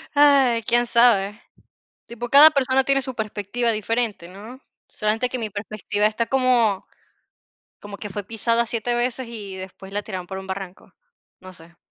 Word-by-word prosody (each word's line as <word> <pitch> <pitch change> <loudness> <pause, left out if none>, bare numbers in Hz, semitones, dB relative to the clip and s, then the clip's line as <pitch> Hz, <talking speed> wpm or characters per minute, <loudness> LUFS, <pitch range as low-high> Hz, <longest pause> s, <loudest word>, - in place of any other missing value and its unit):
Ay, 275 -5 +4
quién 240 +2 +1
sabe. 225 -4 +3 0.7
Tipo, 240 +1 -7
cada 290 +4 +9
persona 270 -2 +2
tiene 275 +1 +1
su 260 -1 -6
perspectiva 220 +2 -2
diferente, 220 -4 -2
¿no? 215 +8 -12 0.3
Solamente 220 +3 -1
que 255 - -4
mi 220 -3 -3
perspectiva 210 0 -2
está 220 +2 -1
como, 245 -6 +1 0.9
como 205 -1 -10
que 210 - -6
fue 205 +1 -5
pisada 230 +3 0
7 235 +1 -2
veces 245 0 -2
y 205 -5 -7
después 190 +1 -10
la 205 - -2
tiraron 185 -4 -7
por 190 +1 -7
un 190 - -9
barranco, 190 -1 -8 0.5
no 185 0 -12
sé. 170 0 -17
225 Hz, 160 wpm, -22 LUFS, 200-245 Hz, 0.9 s, cada